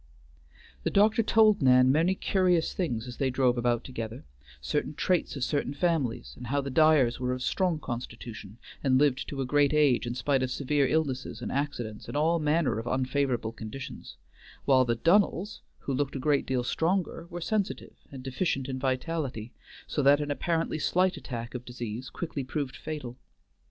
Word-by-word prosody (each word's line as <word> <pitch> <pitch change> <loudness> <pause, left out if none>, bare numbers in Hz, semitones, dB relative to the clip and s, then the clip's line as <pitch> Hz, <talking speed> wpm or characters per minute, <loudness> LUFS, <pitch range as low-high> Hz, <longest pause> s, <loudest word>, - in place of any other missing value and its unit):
The - - 0
doctor 215 +3 +4
told 215 -2 +4
Nan 130 -1 +6
many 165 +6 +3
curious 180 -4 +1
things 125 -10 -2
as 125 - -8
they 135 - +1
drove 125 -1 +2
about 120 -1 0
together: 115 -2 -6 0.3
certain 145 - -2
traits 180 -1 0
of 135 - -3
certain 145 0 -1
families, 135 - -1
and 125 - -9
how 140 +3 0
the 140 -1 -3
Dyers 150 -5 +4
were 125 0 -1
of 125 0 -4
strong 180 0 +1
constitution, 115 -5 -7 0.3
and 130 -2 +4
lived 140 -2 +2
to 140 -2 -4
a - - -1
great 145 +2 +3
age 140 -5 +3
in 120 - -3
spite 135 +2 +1
of 130 - 0
severe 140 +1 +1
illnesses 130 -6 -1
and - - -3
accidents 130 -7 -3
and - - -3
all 165 +3 +2
manner 150 -5 +1
of 115 - -6
unfavorable 130 -2 0
conditions; 115 +3 -8 0.5
while 130 -2 +5
the 120 -1 +1
Dunnells, 195 - +2 0.2
who 140 - -3
looked 140 +1 -1
a - - -2
great 145 +1 +1
deal 130 -2 0
stronger, 170 +4 -1
were 175 0 -6
sensitive, 200 +3 -2 0.2
and 135 -2 -8
deficient 135 0 -1
in 130 -1 -4
vitality, 130 -3 -2 0.3
so 145 - -1
that 140 +1 +5
an 145 -1 -2
apparently 165 +1 -1
slight 180 +4 +2
attack 120 -5 -6
of 125 -1 -5
disease 120 0 -6
quickly 160 -5 -4
proved 135 0 -3
fatal. 135 -6 -6
135 Hz, 175 wpm, -28 LUFS, 125-155 Hz, 0.5 s, Nan